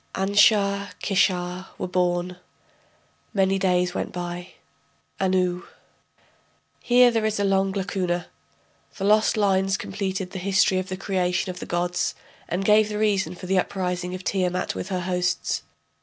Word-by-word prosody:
Anshar, 200 0 +3
Kishar 185 -2 0
were - - -3
born. 180 0 0 1.0
Many 195 0 +2
days 180 -1 +1
went - - -3
by. 175 0 -6 0.7
Anu.... 185 -1 0 1.1
[Here 245 0 +5
there 225 -1 0
is 215 -1 -2
a - - +1
long 195 0 +2
lacuna. 185 -3 -2 0.7
The 195 - -4
lost 215 +2 +3
lines 195 -1 +2
completed 190 -4 -4
the 190 - -5
history 190 0 +2
of 185 - -5
the 185 - -4
creation 185 -1 -1
of 180 - -10
the - - -7
gods, 175 +1 -1 0.3
and 185 +3 -2
gave 210 +1 +5
the 210 - -3
reason 195 -5 +1
for 180 - -9
the 190 +1 +2
uprising 180 -1 -2
of 185 - -8
Tiamat 185 -2 -1
with 190 - -5
her 185 -2 -2
hosts. 180 0 -1
190 Hz, 145 wpm, -24 LUFS, 180-200 Hz, 1.1 s, Here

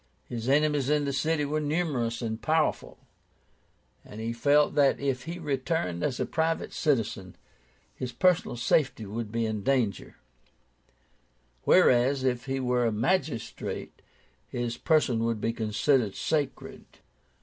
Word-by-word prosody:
His 120 +1 -4
enemies 145 -1 +2
in 150 -1 +2
the 140 - -2
city 150 +2 0
were 150 +2 -1
numerous 145 -7 -1
and 110 0 -3
powerful, 160 0 0 1.1
and 105 - -11
he 115 +1 -3
felt 145 +5 +3
that, 140 -2 +3
if 135 -2 -2
he 170 +2 -5
returned 140 - -2
as 135 -4 -1
a - - 0
private 160 +1 -1
citizen, 110 - -1 0.6
his 125 -1 -5
personal 180 -5 +2
safety 120 -2 +1
would 105 +1 -5
be 115 0 0
in 110 -2 -2
danger; 115 -5 -1 1.5
whereas, 130 +2 +4
if 125 -2 0
he 135 0 -1
were 125 -2 +1
a - - +1
magistrate, 120 - -2 0.5
his 120 -1 -3
person 150 -8 +2
would 115 -1 -1
be 115 +2 -1
considered 110 +1 +1
sacred. 150 -4 -2
130 Hz, 135 wpm, -28 LUFS, 115-150 Hz, 1.5 s, whereas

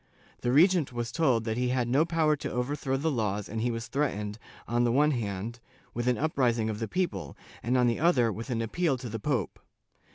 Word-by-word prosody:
The 120 - 0
regent 165 +1 +4
was 120 -1 -3
told 130 -7 +2
that 110 0 -2
he 125 0 +1
had 125 -1 0
no 135 +6 +3
power 160 -2 +2
to - - -5
overthrow 135 +2 -1
the 160 +4 0
laws 105 -5 -1
and 110 +1 -4
he 120 - +1
was 115 -1 -3
threatened, 105 -8 -2 0.3
on 120 +1 +1
the 120 - +2
one 150 +5 +4
hand, 110 -1 -3 0.3
with 120 +1 -2
an 125 - +2
uprising 120 -7 +1
of 105 - -5
the 115 - -2
people, 180 +5 -2 0.2
and, 125 +3 +1
on 125 - +4
the 120 -1 +1
other, 135 -9 +3
with 115 +6 -7
an 115 -2 -1
appeal 145 +4 0
to 125 -1 -7
the 115 +1 -4
pope. 125 - -2
125 Hz, 220 wpm, -28 LUFS, 115-145 Hz, 0.3 s, regent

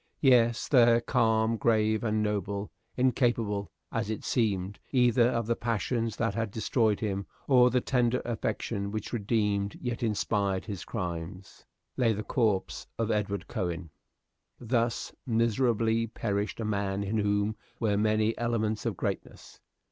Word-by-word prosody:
Yes, 120 -4 +4
there, 120 -3 +6
calm, 115 -2 +2
grave, 110 -1 +2
and 110 -1 +1
noble, 100 -1 -2 0.3
incapable, 120 -5 +1 0.2
as - - -2
it 110 - -3
seemed, 100 -4 0
either 125 -2 +4
of 115 -2 -1
the 115 +1 +1
passions 115 0 -1
that 115 0 0
had 115 -1 -2
destroyed 110 0 +1
him 100 -2 -2 0.2
or 125 -2 +6
the 125 0 +1
tender 125 -1 +1
affection 110 -3 -2
which 110 +2 -5
redeemed 105 -2 0
yet 120 0 -3
inspired 100 -3 0
his 100 -5 -6
crimes, 90 -2 -6 0.3
lay 115 -3 +3
the 105 +1 -4
corpse 105 -7 0
of 115 -1 0
Edward 100 -1 -1
Cowen. 90 -6 -3 0.7
Thus 115 -1 -1
miserably 115 -1 +2
perished 105 -1 -2
a 110 - -2
man 100 -1 -1
in 105 +2 -1
whom 105 +1 +1 0.2
were 110 -3 +1
many 110 +1 +2
elements 110 -2 -1
of 105 -6 -2
greatness. - - -5
110 Hz, 140 wpm, -29 LUFS, 100-115 Hz, 0.7 s, there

